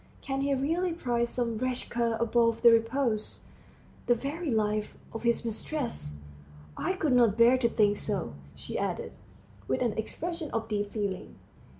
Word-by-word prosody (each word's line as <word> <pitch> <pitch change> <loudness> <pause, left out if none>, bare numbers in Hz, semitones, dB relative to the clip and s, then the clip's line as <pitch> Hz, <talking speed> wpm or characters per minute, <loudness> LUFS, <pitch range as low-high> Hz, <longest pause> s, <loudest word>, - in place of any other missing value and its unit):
Can 270 0 -2
he 280 0 +1
really 330 +6 0
prize 240 -7 0
some 235 -3 -1
wretched 255 0 -2
cur 235 -1 +1
above 230 0 +2
the 235 - +9
repose 230 -1 +1 0.7
the 240 - +5
very 295 +7 -4
life 215 -2 0 0.2
of 225 - -5
his 235 0 +1
mistress? 230 - -3 0.6
I - - -1
could 320 -8 0
not 235 -4 +4
bear 235 +2 +7
to 235 -2 +2
think 205 -2 +3
so," 195 - -2 0.2
she - - -5
added, - - -3 0.5
with 130 - +1
an 235 -3 +1
expression 330 +8 -4
of 225 -1 -1
deep 205 -2 -2
feeling. 200 -4 -3
235 Hz, 160 wpm, -29 LUFS, 220-270 Hz, 0.7 s, the